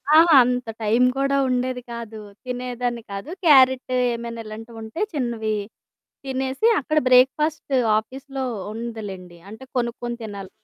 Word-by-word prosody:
అహా! 325 Hz, -2 st, +7 dB
అంత 250 Hz, 0 st, -1 dB, 0.2 s
టైం 225 Hz, +4 st, +3 dB
కూడా 275 Hz, 0 st, +1 dB
ఉండేది 250 Hz, 0 st, -1 dB
కాదు, 230 Hz, -2 st, -7 dB, 0.3 s
తినేదాన్ని 245 Hz, -1 st, -3 dB
కాదు. 200 Hz, +8 st, -6 dB, 0.2 s
క్యారెట్ 260 Hz, -4 st, +5 dB
ఏమైనా 235 Hz, -2 st, -1 dB
ఇలాంటివి 225 Hz, +2 st, -9 dB
ఉంటే 220 Hz, -, -6 dB
చిన్నవి 235 Hz, -6 st, -1 dB, 0.7 s
తినేసి 265 Hz, +8 st, 0 dB
అక్కడ 310 Hz, +2 st, -2 dB
బ్రేక్ 255 Hz, +1 st, +6 dB
ఫాస్ట్ 300 Hz, -2 st, -2 dB, 0.2 s
ఆఫీస్‌లో 265 Hz, +4 st, -5 dB, 0.3 s
ఉందిలేండి 205 Hz, -6 st, -7 dB
అంటే 220 Hz, +4 st, -10 dB
కొనుక్కొని 240 Hz, 0 st, -2 dB
తినాలి. 200 Hz, -3 st, -7 dB
245 Hz, 125 wpm, -23 LUFS, 225-265 Hz, 0.7 s, అహా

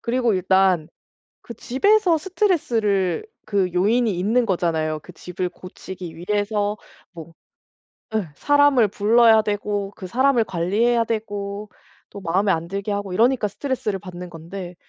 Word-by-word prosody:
그리고 240 Hz, -2 st, +1 dB
일단 185 Hz, -3 st, +2 dB, 0.5 s
그 235 Hz, -, -9 dB
집에서 360 Hz, -, +2 dB
스트레스를 245 Hz, -, 0 dB, 0.2 s
그 195 Hz, -3 st, 0 dB
요인이 220 Hz, +6 st, +2 dB
있는 225 Hz, +7 st, +2 dB
거잖아요. 160 Hz, -5 st, -1 dB
그 180 Hz, -, -13 dB
집을 180 Hz, +1 st, -4 dB
고치기 180 Hz, -1 st, -10 dB
위해서 205 Hz, +3 st, -1 dB, 0.3 s
뭐 165 Hz, -2 st, -11 dB, 0.8 s
예 215 Hz, -5 st, -1 dB
사람을 285 Hz, -, +4 dB
불러야 220 Hz, +2 st, +5 dB
되고 205 Hz, -1 st, -2 dB
그 190 Hz, -, -9 dB
사람을 255 Hz, +5 st, +2 dB
관리해야 220 Hz, +6 st, +1 dB
되고 205 Hz, -2 st, -4 dB, 0.4 s
또 200 Hz, -, -9 dB
마음에 195 Hz, +2 st, +1 dB
안 165 Hz, -1 st, -1 dB
들게 200 Hz, +3 st, -4 dB
하고 200 Hz, -2 st, -3 dB
이러니까 235 Hz, +2 st, +2 dB
스트레스를 215 Hz, -3 st, -3 dB
받는 180 Hz, -1 st, -9 dB
건데 175 Hz, +2 st, -8 dB
205 Hz, 300 characters per minute, -22 LUFS, 180-235 Hz, 0.8 s, 불러야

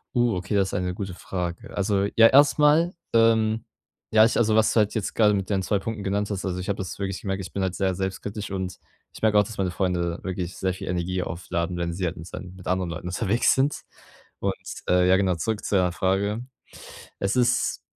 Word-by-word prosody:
Oh, 120 Hz, -4 st, +3 dB
okay, 90 Hz, +3 st, -3 dB
das 95 Hz, -1 st, +2 dB
ist -, -, -9 dB
eine 90 Hz, 0 st, -1 dB
gute 95 Hz, -2 st, -5 dB
Frage. 90 Hz, -1 st, -5 dB
Also, 100 Hz, 0 st, +1 dB
ja, 115 Hz, 0 st, +8 dB
erst 140 Hz, +3 st, +5 dB
mal, 155 Hz, +4 st, +4 dB, 0.2 s
ähm, 115 Hz, -1 st, +3 dB, 0.5 s
ja, 110 Hz, 0 st, +7 dB
ich 115 Hz, -, +1 dB
also, 110 Hz, -2 st, +3 dB
was 110 Hz, 0 st, +4 dB
du -, -, -1 dB
halt 105 Hz, -1 st, +3 dB
jetzt 105 Hz, -, -2 dB
grade 105 Hz, -2 st, +4 dB
mit 95 Hz, 0 st, -2 dB
deinen 95 Hz, -2 st, 0 dB
2 100 Hz, +2 st, +1 dB
Punkten 105 Hz, 0 st, -5 dB
genannt 100 Hz, +1 st, -1 dB
hast, 100 Hz, -1 st, -3 dB
also, 90 Hz, -1 st, -2 dB
ich 90 Hz, -, -5 dB
habe 100 Hz, -, 0 dB
das 95 Hz, -, -5 dB
wirklich 95 Hz, -1 st, -4 dB
gemerkt, 95 Hz, -1 st, -3 dB
ich -, -, -10 dB
bin 100 Hz, -, -2 dB
halt 95 Hz, -1 st, -1 dB
sehr 95 Hz, -1 st, 0 dB
selbstkritisch 100 Hz, +2 st, -4 dB
und 95 Hz, -1 st, -4 dB, 0.3 s
ich -, -, -12 dB
merke 110 Hz, -1 st, +3 dB
auch, 105 Hz, -, +6 dB
dass 110 Hz, +1 st, -9 dB
meine 95 Hz, -2 st, 0 dB
Freunde 90 Hz, -2 st, -1 dB
wirklich 95 Hz, -1 st, -4 dB
sehr 95 Hz, -1 st, 0 dB
viel -, -, -8 dB
Energie 90 Hz, +1 st, -1 dB
aufladen, 90 Hz, 0 st, -3 dB
wenn 85 Hz, -1 st, -2 dB
sie 90 Hz, +1 st, -2 dB
halt 85 Hz, +2 st, -3 dB
mit 80 Hz, +2 st, -9 dB
sei -, -, -7 dB
mit 90 Hz, 0 st, -10 dB
anderen 90 Hz, -1 st, 0 dB
Leuten 85 Hz, +2 st, -6 dB
unterwegs 110 Hz, +5 st, +2 dB
sind. 135 Hz, +2 st, 0 dB, 0.6 s
Und, -, -, 0 dB, 0.3 s
ähm, 90 Hz, 0 st, +4 dB
ja, 95 Hz, +1 st, +5 dB
genau, 95 Hz, -3 st, +1 dB
zurück 105 Hz, +5 st, -2 dB
zu 100 Hz, -, -1 dB
deiner 90 Hz, -2 st, +3 dB
Frage. 100 Hz, +6 st, 0 dB, 0.7 s
Es 100 Hz, +4 st, 0 dB
ist 125 Hz, -1 st, +1 dB
95 Hz, 230 wpm, -25 LUFS, 90-110 Hz, 0.7 s, ja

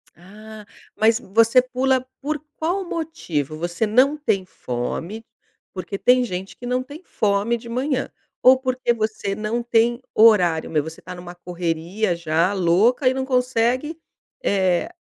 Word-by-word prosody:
Ah, 210 Hz, +5 st, -13 dB, 0.3 s
mas 220 Hz, +2 st, +3 dB
você 230 Hz, +4 st, +4 dB
pula 255 Hz, +1 st, 0 dB, 0.2 s
por 300 Hz, +2 st, -2 dB, 0.2 s
qual 355 Hz, +5 st, -1 dB
motivo? 175 Hz, -, -3 dB
Você 175 Hz, +6 st, -2 dB
não 255 Hz, +7 st, +3 dB
tem 195 Hz, -10 st, 0 dB
fome? 175 Hz, -, -5 dB, 0.5 s
Porque 195 Hz, +1 st, -5 dB
tem 250 Hz, +4 st, +4 dB
gente 190 Hz, -4 st, -5 dB
que 245 Hz, -, -10 dB
não 250 Hz, +1 st, 0 dB
tem 285 Hz, +5 st, -11 dB
fome 210 Hz, -, 0 dB
de 235 Hz, 0 st, -12 dB
manhã. 260 Hz, +3 st, -1 dB, 0.3 s
Ou 255 Hz, +1 st, +7 dB
porque 255 Hz, -2 st, 0 dB
você 215 Hz, -3 st, -2 dB
não 215 Hz, +3 st, -2 dB
tem 235 Hz, +1 st, +2 dB
horário 180 Hz, -8 st, +4 dB
mesmo 155 Hz, -1 st, -1 dB
você 160 Hz, -, -14 dB
tá 180 Hz, -, -8 dB
numa 175 Hz, 0 st, -10 dB
correria 175 Hz, +3 st, -2 dB
já 170 Hz, +3 st, 0 dB
louca 200 Hz, -, +3 dB
e -, -, 0 dB
não 265 Hz, 0 st, -2 dB
consegue, 255 Hz, +4 st, 0 dB, 0.4 s
eh, 185 Hz, -3 st, +1 dB
220 Hz, 150 wpm, -22 LUFS, 180-255 Hz, 0.5 s, Ou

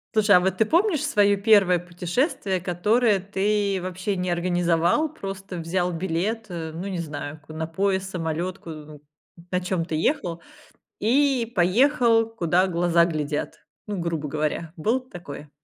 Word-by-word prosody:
Слушай, 205 Hz, -2 st, +5 dB
а -, -, +7 dB
вот 190 Hz, 0 st, 0 dB
ты 220 Hz, -, +3 dB
помнишь 335 Hz, -, +2 dB
своё 205 Hz, -1 st, +3 dB
1 200 Hz, -5 st, +5 dB
путешествие, 180 Hz, -, -2 dB
которое 205 Hz, +5 st, +2 dB
ты 200 Hz, 0 st, 0 dB
вообще 185 Hz, +2 st, -3 dB
не 180 Hz, 0 st, -2 dB
организовал, 175 Hz, -, +1 dB
просто 195 Hz, -, -7 dB
взял 175 Hz, +2 st, -1 dB
билет, 190 Hz, +6 st, -2 dB
э, 160 Hz, -2 st, -5 dB
ну 170 Hz, +4 st, -6 dB
не 190 Hz, -3 st, -3 dB
знаю, 150 Hz, -1 st, -6 dB
ку 155 Hz, -, -14 dB
на 160 Hz, 0 st, -3 dB
поезд, 190 Hz, +3 st, -1 dB
самолёт, 175 Hz, +2 st, -3 dB
у 150 Hz, -2 st, -9 dB, 0.5 s
на 180 Hz, 0 st, 0 dB
чём 180 Hz, -2 st, -2 dB
ты 160 Hz, -, -3 dB
ехал, 175 Hz, -, 0 dB, 0.6 s
и 250 Hz, 0 st, +2 dB
поехал 225 Hz, +4 st, +3 dB
куда 180 Hz, -4 st, +2 dB
глаза 170 Hz, -1 st, +3 dB
глядят? 150 Hz, -3 st, -3 dB, 0.3 s
Ну, 205 Hz, -3 st, -4 dB
грубо 165 Hz, -3 st, -2 dB
говоря, 155 Hz, +2 st, -2 dB
было 225 Hz, +11 st, +1 dB
такое? 175 Hz, -, -10 dB
180 Hz, 150 wpm, -24 LUFS, 170-210 Hz, 0.6 s, а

